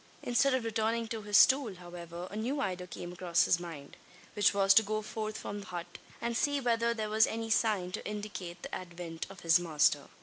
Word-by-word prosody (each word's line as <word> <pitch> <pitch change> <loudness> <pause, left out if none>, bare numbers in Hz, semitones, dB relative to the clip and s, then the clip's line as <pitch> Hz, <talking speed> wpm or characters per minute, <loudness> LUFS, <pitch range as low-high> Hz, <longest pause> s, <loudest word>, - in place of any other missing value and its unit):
Instead 260 +2 +3
of 255 - -1
returning 225 +1 0
to 220 0 -4
his 205 -1 +3
stool, 260 -7 +5
however, 175 0 -8
a - - -7
new 245 +7 -2
idea 180 -7 -3
came 175 0 -7
across 175 -1 +2
his 175 - +3
mind; 160 -5 -9 0.4
which 205 - +4
was 195 -1 +4
to 225 - +7
go 215 0 -2
forth 215 0 -4
from 205 - -5
the 200 - -10
hut, 175 -1 -7 0.2
and 235 0 -2
see 285 +4 +1
whether 235 -2 +1
there 220 -2 -2
was 220 +1 +4
any 225 0 -4
sign 205 -6 +1
to 205 - -5
indicate 205 -4 -6
the - - -7
advent 170 -2 -6
of 195 -2 -12
his 165 +1 +5
master. 150 -4 +2
205 Hz, 210 wpm, -31 LUFS, 175-225 Hz, 0.4 s, to